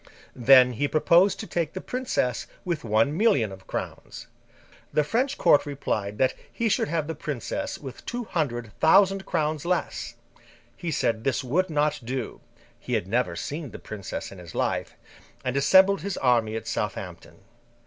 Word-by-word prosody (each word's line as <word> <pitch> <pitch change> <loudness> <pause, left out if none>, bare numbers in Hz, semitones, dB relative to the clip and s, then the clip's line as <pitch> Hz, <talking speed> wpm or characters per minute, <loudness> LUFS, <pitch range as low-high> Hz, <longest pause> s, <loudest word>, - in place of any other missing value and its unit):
Then, 125 0 +6
he 145 +5 0
proposed 170 +6 +4
to - - -6
take 165 -3 -2
the 190 - -4
princess 245 - -2 0.2
with 170 -4 -2
one 115 +7 +2
million 140 - +3
of 95 0 -12
crowns. - - -6 0.7
The 150 - +2
French 255 - 0
Court 145 - +5
replied 105 -7 -3
that 130 +2 +2 0.2
he 230 -1 0
should - - +1
have 160 0 -1
the 160 - -4
princess 155 - -4
with 135 -3 -9
two 245 0 -3
hundred 120 - -2
thousand 195 +3 +4
crowns 155 -3 -1
less; 180 +1 -2 0.6
he 175 - -5
said 115 -7 0
this 135 0 0
would 175 +9 +1
not 150 -1 +1
do 125 0 -4 0.4
(he - - -5
had - - 0
never 115 -4 0
seen 145 - -5
the - - -9
princess 100 -4 -6
in 95 - -11
his 85 -2 -11
life), - - -1 0.5
and 130 0 -1
assembled 190 +7 +5
his 200 -2 -3
army 115 -4 +2
at 110 - -4
Southampton. 95 -4 -5
145 Hz, 165 wpm, -26 LUFS, 115-175 Hz, 0.7 s, Then